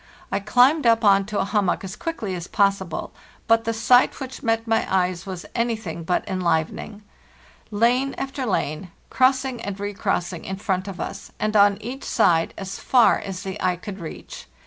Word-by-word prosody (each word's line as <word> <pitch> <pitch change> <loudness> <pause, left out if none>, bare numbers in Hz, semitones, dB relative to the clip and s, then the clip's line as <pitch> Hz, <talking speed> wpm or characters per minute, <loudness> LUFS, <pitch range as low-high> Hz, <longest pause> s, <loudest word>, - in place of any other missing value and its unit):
I 195 - +1
climbed 250 +7 +4
up 230 0 +4
on 195 -1 +5
to 210 -1 -3
a - - +1
hum 205 0 +1
mock 180 - 0
as 190 +1 -6
quickly 225 - -4
as 175 -1 -5
possible, 195 -4 0 0.3
but 225 0 +3
the 230 - +1
sight 230 +3 +3
which 260 -2 -7
met 225 -1 0
my 225 -1 +1
eyes 185 0 0
was 185 -2 -6
anything 220 -8 -2
but 175 +2 -1
enlivening 185 +3 -2 0.4
— - - -27 0.2
lane 240 +5 +1
after 270 -1 -4
lane, 180 -2 -2 0.2
cross 260 +1 +3
ing 250 -3 -4
and 200 -2 -5
recrossing, 190 -4 -2
in 190 - -4
front 190 -1 -2
of 190 -3 -7
us - - -6
and 215 0 -1
on 200 -1 +5
each 250 +5 -6
side, 165 -7 +2
as 195 0 -6
far 245 -3 +4
as 190 -1 -6
the 195 +1 -6
eye 180 -1 +2
could 195 +2 -8
reach. 165 -3 -9
205 Hz, 190 wpm, -23 LUFS, 185-230 Hz, 0.4 s, on